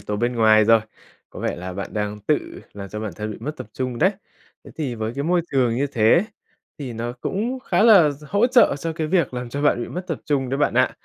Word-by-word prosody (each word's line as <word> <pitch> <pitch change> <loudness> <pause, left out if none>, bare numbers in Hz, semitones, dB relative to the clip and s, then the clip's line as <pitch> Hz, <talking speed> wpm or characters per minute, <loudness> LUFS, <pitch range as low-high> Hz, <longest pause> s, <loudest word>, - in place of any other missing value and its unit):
tố 105 +1 -4
bên 120 +2 -1
ngoài 110 -1 +5
rồi. 115 0 +5 0.5
Có - - -9
vẻ - - -2
là 90 +1 -6
bạn 100 +2 -6
đang 105 0 -2
tự 105 - -2
làm 100 -1 -8
cho 105 +2 -6
bản 110 -4 -4
thân 105 0 -4
bị - - -6
mất 150 +5 -5
tập - - -7
trung 125 -2 -4
đấy. 185 +4 +4 0.5
Thế - - -12
thì 140 -6 -3
với 110 0 -3
cái 140 - -3
môi 175 +1 +2
trường 125 -4 +2
như 140 +2 +1
thế 130 - +3 0.5
thì 130 -4 -5
nó 120 +2 -4
cũng 220 - -3
khá 255 - +1
là 195 -10 +7
d 145 +2 -10
hỗ 205 +5 +3
trợ 245 - +5
cho 165 +1 -3
cái 160 -1 -3
việc 165 -6 +1
làm 125 -1 -4
cho 140 +4 -4
bạn 120 -5 +2
bị - - -6
mất 180 - -5
tập - - -3
trung 135 -4 0
đấy 135 +2 -2
bạn 145 - +1
ạ. - - +3
125 Hz, 260 wpm, -22 LUFS, 110-155 Hz, 0.5 s, là